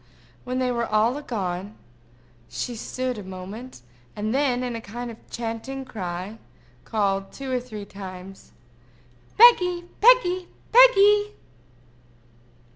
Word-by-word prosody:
When 255 Hz, 0 st, -3 dB
they 255 Hz, -1 st, 0 dB
were 235 Hz, -1 st, -1 dB
all 225 Hz, +7 st, +1 dB
gone, 200 Hz, -5 st, -4 dB, 0.7 s
she 245 Hz, -, -4 dB
stood 255 Hz, +1 st, -4 dB
a -, -, -8 dB
moment, 190 Hz, -, -9 dB, 0.3 s
and 215 Hz, +2 st, -2 dB
then, 260 Hz, -3 st, +1 dB
in 245 Hz, -2 st, -3 dB
a 230 Hz, -, -5 dB
kind 240 Hz, +3 st, -7 dB
of 225 Hz, -, -16 dB
chanting 240 Hz, +4 st, -5 dB
cry, 190 Hz, -1 st, -6 dB, 0.5 s
called, 195 Hz, -2 st, -1 dB
two 270 Hz, -1 st, -7 dB
or 255 Hz, -, +1 dB
three 215 Hz, -5 st, -8 dB
times, 190 Hz, -1 st, -10 dB, 0.9 s
"Peggy! 360 Hz, -7 st, +6 dB, 0.2 s
Peggy! 370 Hz, -7 st, +5 dB, 0.2 s
Peggy!" 420 Hz, -4 st, +6 dB
240 Hz, 120 wpm, -24 LUFS, 205-275 Hz, 0.9 s, Peggy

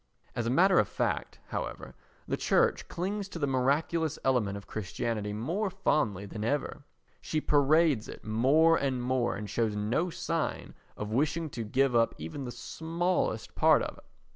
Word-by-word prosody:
As 120 Hz, -1 st, -1 dB
a -, -, +1 dB
matter 180 Hz, +8 st, +5 dB
of 105 Hz, -, +3 dB
fact, -, -, -2 dB
however, -, -, -5 dB, 0.3 s
the -, -, 0 dB
Church -, -, +2 dB
clings 195 Hz, +3 st, -3 dB
to 180 Hz, -, -7 dB
the 150 Hz, -, 0 dB
miraculous 145 Hz, +4 st, +1 dB
element 115 Hz, -7 st, +1 dB
of 100 Hz, -, -10 dB
Christianity 105 Hz, +1 st, -3 dB
more 165 Hz, -, -1 dB
fondly 130 Hz, -, 0 dB
than 105 Hz, +1 st, -6 dB
ever; 145 Hz, +3 st, -2 dB, 0.4 s
she 155 Hz, -, -1 dB
parades 150 Hz, -3 st, +3 dB
it -, -, -10 dB
more 140 Hz, +10 st, +4 dB
and 130 Hz, -3 st, -1 dB
more, 125 Hz, -2 st, +1 dB
and 105 Hz, +1 st, -5 dB
shows 110 Hz, -1 st, 0 dB
no 115 Hz, +12 st, 0 dB
sign 165 Hz, -1 st, -3 dB, 0.2 s
of 105 Hz, 0 st, -4 dB
wishing 155 Hz, +5 st, 0 dB
to 115 Hz, -, -4 dB
give 130 Hz, +4 st, +1 dB
up 115 Hz, -1 st, +3 dB
even 80 Hz, -, -6 dB
the 120 Hz, -, -5 dB
smallest 165 Hz, +8 st, -2 dB
part -, -, +4 dB
of -, -, -6 dB
it. -, -, -20 dB
135 Hz, 165 wpm, -30 LUFS, 110-160 Hz, 0.4 s, matter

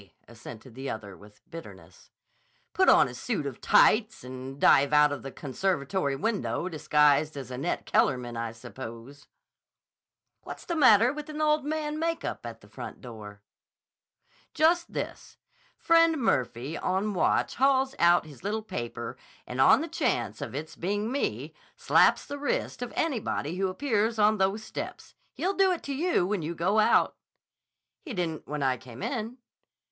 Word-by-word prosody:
assented 115 Hz, +1 st, -12 dB
the 135 Hz, +3 st, -6 dB
other 100 Hz, -3 st, -6 dB
with 105 Hz, +2 st, -19 dB
bitterness. 165 Hz, -1 st, -12 dB, 0.6 s
"Put 375 Hz, -, +4 dB
on -, -, +6 dB
a -, -, -8 dB
suit 210 Hz, -11 st, -3 dB
of 135 Hz, -4 st, -6 dB
tights 220 Hz, 0 st, +4 dB
and 130 Hz, +2 st, -8 dB
dive 140 Hz, +1 st, +5 dB
out 150 Hz, 0 st, +6 dB
of 145 Hz, -4 st, -4 dB
the 135 Hz, -, -7 dB
conservatory 145 Hz, 0 st, -2 dB
window 200 Hz, +2 st, -2 dB
disguised 150 Hz, -2 st, +2 dB
as 130 Hz, -2 st, -7 dB
Annette 125 Hz, +2 st, -3 dB
Kellerman, 125 Hz, -3 st, +1 dB
I 115 Hz, 0 st, -3 dB
suppose." 115 Hz, +4 st, -10 dB, 1.1 s
"What's -, -, -9 dB
the 340 Hz, -, -2 dB
matter 245 Hz, -4 st, +6 dB
with 300 Hz, +1 st, -7 dB
an 305 Hz, 0 st, -6 dB
old 300 Hz, -1 st, +2 dB
man 305 Hz, 0 st, -2 dB
makeup 330 Hz, 0 st, -3 dB
and -, -, -9 dB
the -, -, -18 dB
front -, -, -9 dB
door?" 105 Hz, -4 st, -11 dB, 1.1 s
"Just 335 Hz, +2 st, +3 dB
this. -, -, -6 dB, 0.4 s
Friend 330 Hz, -1 st, +4 dB
Murphy 130 Hz, -, -1 dB
on 195 Hz, +3 st, -1 dB
watch 180 Hz, -, +1 dB
hauls 270 Hz, 0 st, +3 dB
out 170 Hz, 0 st, +4 dB
his 150 Hz, 0 st, -14 dB
little 215 Hz, +2 st, -2 dB
paper 120 Hz, -, -6 dB, 0.3 s
and 125 Hz, +1 st, -2 dB
on 265 Hz, -, +6 dB
the 325 Hz, -, -3 dB
chance 230 Hz, -, -1 dB
of -, -, -6 dB
its 155 Hz, +2 st, -6 dB
being 205 Hz, +5 st, -2 dB
me, 280 Hz, -, -2 dB, 0.2 s
slaps -, -, +4 dB
the 285 Hz, 0 st, -6 dB
wrist 285 Hz, -3 st, -2 dB
of 245 Hz, -, -4 dB
anybody 220 Hz, -, -2 dB
who 190 Hz, 0 st, +1 dB
appears 225 Hz, +1 st, 0 dB
on 215 Hz, 0 st, +3 dB
those 195 Hz, +3 st, +1 dB
steps. -, -, -7 dB, 0.2 s
He'll 380 Hz, +2 st, -1 dB
do 390 Hz, -1 st, +3 dB
it 355 Hz, -, -3 dB
to 280 Hz, -, -4 dB
you 325 Hz, -, +1 dB
when 200 Hz, -1 st, -1 dB
you 165 Hz, +2 st, -4 dB
go 185 Hz, +6 st, +1 dB
out." 215 Hz, -, +3 dB, 0.8 s
"He 275 Hz, -9 st, -8 dB
didn't 165 Hz, -3 st, -3 dB
when 150 Hz, -1 st, -3 dB
I 130 Hz, -1 st, +1 dB
came 125 Hz, 0 st, -11 dB
in." 235 Hz, -1 st, -3 dB
180 Hz, 160 wpm, -28 LUFS, -, 1.1 s, on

